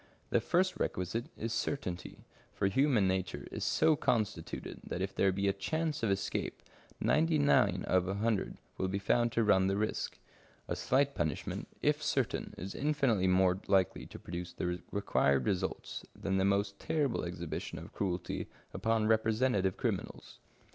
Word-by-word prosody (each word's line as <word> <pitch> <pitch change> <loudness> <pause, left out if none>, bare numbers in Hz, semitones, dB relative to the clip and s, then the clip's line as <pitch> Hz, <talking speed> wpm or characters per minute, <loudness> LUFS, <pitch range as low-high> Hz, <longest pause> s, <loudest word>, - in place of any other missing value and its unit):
The - - +3
first 185 +1 +1
requisite 90 +7 -1
is 115 0 -3
certainty, 90 -8 -3 0.3
for - - 0
human 115 0 +3
nature 95 -2 -1
is - - -4
so 160 - +4
constituted 105 - -1
that - - -4
if 95 +1 -2
there 95 0 +3
be 100 +1 0
a 100 - +3
chance 155 +10 -2
of 115 - +1
escape, 100 0 -2 0.4
ninety 160 0 +3
nine 100 -10 +3
out 95 - +4
of 90 0 +1
a 95 - -1
hundred 110 -1 0 0.2
will 95 - +1
be 95 +1 -1
found 120 +4 +2
to 115 - +3
run 95 -3 +4
the 95 +1 +1
risk. 110 +1 -2 0.5
A - - -1
slight 140 +2 +2
punishment, 80 - -2 0.2
if - - +2
certain, - - -1
is 95 +3 -5
infinitely 135 -10 +2
more 90 0 +4
likely 95 -3 +2
to - - -10
produce 85 0 -6
the 90 0 -2
required 70 -9 +2
results 95 -1 -2
than 95 -1 -1
the 95 - +3
most 100 0 +1
terrible 145 -6 0
exhibition 85 -2 -4
of - - -9
cruelty 90 -3 -2 0.3
upon 115 -1 +1
representative 110 -3 +2
criminals. - - -3
100 Hz, 160 wpm, -33 LUFS, 95-115 Hz, 0.5 s, so